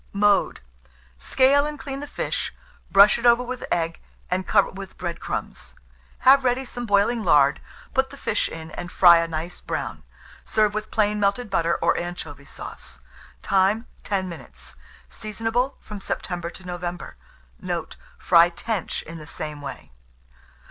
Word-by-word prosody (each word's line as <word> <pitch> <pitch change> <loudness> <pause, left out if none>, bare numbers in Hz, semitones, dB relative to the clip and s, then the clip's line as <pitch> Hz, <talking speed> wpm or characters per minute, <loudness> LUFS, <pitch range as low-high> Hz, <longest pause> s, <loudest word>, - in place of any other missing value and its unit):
Mode. 205 0 +2 0.6
Scale 275 - +3
and 300 0 -5
clean 275 -2 -6
the 290 - -6
fish, - - -3 0.4
brush 200 +3 +7
it 235 - -5
over 235 +1 +5
with 250 0 -5
egg, 165 0 0 0.3
and 185 +1 -1
cover 200 -2 +3
with 195 0 -9
bread 175 -2 -4
crumbs. - - -5 0.5
Have 270 +1 +7
ready 255 +1 +1
some 245 -1 -6
boiling 205 +3 +2
lard; 145 -6 +4 0.3
put 265 0 +2
the 280 - -11
fish - - -1
in, 160 0 -8
and 175 +3 -7
fry 170 -2 +7
a 165 - 0
nice 165 +2 -5
brown. - - -4 0.4
Serve 215 -1 +2
with 215 0 -4
plain 210 -1 +1
melted 205 +3 0
butter 170 0 +2
or - - +3
anchovy 160 -5 -6
sauce. 65 - -9 0.4
Time. 195 +4 +2 0.2
10 190 -2 -1
minutes. 120 - -10 0.3
Seasonable 225 - -2
from 210 -2 -9
September 175 -3 -3
to 185 - -12
November. 175 -2 -5 0.4
Note. - - -4 0.2
Fry 170 -1 +5
tench 195 +2 -3
in 165 0 -9
the 155 - -11
same 150 -2 -6
way. 140 - -8
195 Hz, 155 wpm, -24 LUFS, 170-235 Hz, 0.6 s, brush